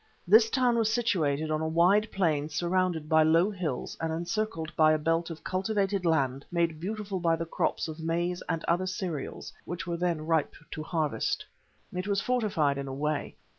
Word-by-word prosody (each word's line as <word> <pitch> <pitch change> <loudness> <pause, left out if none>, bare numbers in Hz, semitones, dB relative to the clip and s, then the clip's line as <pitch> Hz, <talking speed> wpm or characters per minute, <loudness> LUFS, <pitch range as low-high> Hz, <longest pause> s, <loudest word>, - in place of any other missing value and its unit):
This 220 +4 +7
town 245 -2 +2
was 220 -1 +2
situated 160 -10 +1
on 155 0 0
a 160 - 0
wide 180 +7 +3
plain 155 -6 +1
surrounded 175 0 0
by 160 0 +5
low 165 +6 +4
hills 170 -10 -3
and 165 0 -1
encircled 170 -1 -3
by 155 -1 +5
a - - +3
belt 165 +2 0
of 165 -1 -8
cultivated 195 -1 0
land 140 -4 +1
made 170 -2 0
beautiful 200 +1 -3
by 165 -1 +2
the 165 0 -3
crops 165 - -1
of 160 0 -7
maize 170 +2 -1
and 165 -1 -1
other 180 +2 +1
cereals 180 -6 -4
which 170 -1 -5
were 170 0 -2
then 170 -3 -1
ripe 160 -2 +1 0.2
to 155 - -5
harvest. 155 -2 -1 0.5
It 180 +2 -3
was 200 -1 +1
fortified 195 - +1
in 140 - -4
a 135 - -5
way. 150 +1 -2
170 Hz, 185 wpm, -29 LUFS, 155-190 Hz, 0.5 s, This